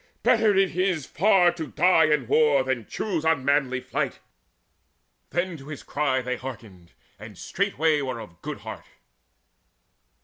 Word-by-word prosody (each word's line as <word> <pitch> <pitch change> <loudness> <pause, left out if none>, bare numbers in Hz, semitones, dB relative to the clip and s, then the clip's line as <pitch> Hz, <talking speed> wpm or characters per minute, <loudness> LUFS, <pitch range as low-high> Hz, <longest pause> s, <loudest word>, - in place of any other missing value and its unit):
Better 215 -3 +4
it 195 -4 +2
is 180 -6 0
by - - -22
far 190 -2 +5
To 165 -3 -6
die 160 - +4
in 150 -4 +1
war 145 +1 +3
than 130 -5 -3
choose 180 -7 -3
unmanly 140 -4 +1
flight!" - - -3 1.1
Then 175 +1 -2
to 135 -1 -13
his 155 -3 -8
cry 135 -3 -1
they 125 0 -3
hearkened, 105 -9 -10 0.3
and 105 0 -11
straightway 160 -6 0
Were 130 -3 -4
of 85 -6 -12
good - - -6
heart. - - -9
150 Hz, 145 wpm, -25 LUFS, 130-175 Hz, 1.1 s, far